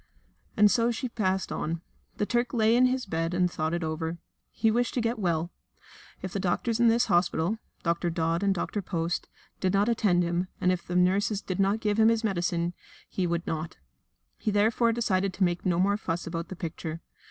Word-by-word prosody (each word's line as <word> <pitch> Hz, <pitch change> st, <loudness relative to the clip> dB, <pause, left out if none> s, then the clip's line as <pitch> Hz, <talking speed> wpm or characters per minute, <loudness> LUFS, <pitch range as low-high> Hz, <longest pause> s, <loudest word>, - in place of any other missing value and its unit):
And 210 Hz, -1 st, +6 dB
so 235 Hz, 0 st, +3 dB
she 240 Hz, +2 st, -2 dB
passed 190 Hz, -5 st, -1 dB
on. 165 Hz, +1 st, -2 dB, 0.4 s
The 210 Hz, -, +1 dB
Turk 240 Hz, +2 st, 0 dB
lay 225 Hz, 0 st, +4 dB
in 255 Hz, +1 st, +5 dB
his 255 Hz, 0 st, -1 dB
bed 165 Hz, -1 st, -2 dB
and 180 Hz, -1 st, +2 dB
thought 155 Hz, -1 st, -1 dB
it 170 Hz, -, -3 dB
over. 160 Hz, +1 st, -3 dB, 0.3 s
He 225 Hz, -, +2 dB
wished 240 Hz, +1 st, 0 dB
to -, -, +1 dB
get 230 Hz, 0 st, -1 dB
well. 170 Hz, -3 st, 0 dB, 0.7 s
If 190 Hz, -, -5 dB
the 200 Hz, -, -1 dB
doctors 215 Hz, +5 st, 0 dB
in 240 Hz, -, +5 dB
this 235 Hz, +2 st, +4 dB
hospital 175 Hz, +3 st, +1 dB, 0.2 s
Dr. 170 Hz, +1 st, 0 dB
Dodd 165 Hz, +1 st, 0 dB
and 200 Hz, -1 st, +2 dB
Dr. 195 Hz, +2 st, -2 dB
Post 170 Hz, -2 st, -2 dB, 0.3 s
did 185 Hz, 0 st, 0 dB
not 200 Hz, +2 st, +3 dB
attend 195 Hz, -6 st, +2 dB
him, 175 Hz, +1 st, -1 dB
and 180 Hz, -, +3 dB
if 180 Hz, -1 st, -3 dB
the 180 Hz, -, -3 dB
nurses 195 Hz, +3 st, +2 dB
did 185 Hz, -1 st, -4 dB
not 200 Hz, +3 st, +2 dB
give 210 Hz, 0 st, 0 dB
him 220 Hz, 0 st, +6 dB
his 230 Hz, 0 st, +1 dB
medicine, 175 Hz, -4 st, 0 dB, 0.3 s
he 185 Hz, -2 st, -1 dB
would 170 Hz, 0 st, -1 dB
not. 160 Hz, +1 st, -4 dB, 0.6 s
He 220 Hz, -, -1 dB
therefore 220 Hz, +3 st, +3 dB
decided 195 Hz, -5 st, 0 dB
to 195 Hz, -, +1 dB
make 175 Hz, 0 st, 0 dB
no 175 Hz, -2 st, +2 dB
more 200 Hz, +3 st, +2 dB
fuss 170 Hz, -5 st, -3 dB
about 165 Hz, 0 st, -4 dB
the 190 Hz, -, -7 dB
picture. 165 Hz, -1 st, -5 dB
185 Hz, 205 wpm, -28 LUFS, 170-220 Hz, 0.7 s, And